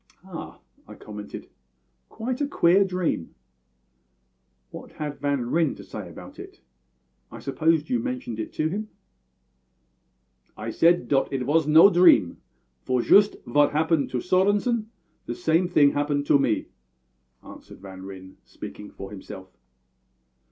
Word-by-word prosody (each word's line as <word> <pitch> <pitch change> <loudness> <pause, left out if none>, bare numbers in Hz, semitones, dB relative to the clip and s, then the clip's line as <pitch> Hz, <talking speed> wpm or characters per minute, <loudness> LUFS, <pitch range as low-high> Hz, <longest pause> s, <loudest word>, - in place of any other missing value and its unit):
"Ah!" - - -9 0.3
I - - -11
commented, 105 -1 -9 0.6
"quite 250 +4 -4
a 290 - +1
queer 190 -7 +4
dream. 180 - -3 1.4
What - - -11
had 150 -2 -6
Van 140 -4 -1
Ryn 165 -3 +1
to - - -12
say - - -8
about - - -12
it? - - -11 0.7
I - - -9
suppose 155 +2 0
you 250 - 0
mentioned 255 - -5
it 110 - -5
to 155 - 0
him?" 210 +6 -4 1.7
"I 110 +1 -5
said 170 +7 +3
dot 135 -2 +1
it 135 -2 -2
vas 150 +3 +1
no 160 +6 +7
dream; 170 - +5 0.4
for 125 -2 -1
shoost 205 +1 +5
vot 145 +4 +2
happened 160 -1 +1
to 125 - -3
Svorenssen, 205 +5 +1 0.4
the 120 - -4
same 165 +6 +1
thing 145 -5 +4
happened 145 0 -1
to 140 - +4
me," 120 -5 0 0.8
answered - - -13
Van 95 -1 -11
Ryn, 95 -1 -11
speaking 105 - -10
for 95 +1 -10
himself. 95 -1 -11
150 Hz, 135 wpm, -25 LUFS, 120-180 Hz, 1.7 s, no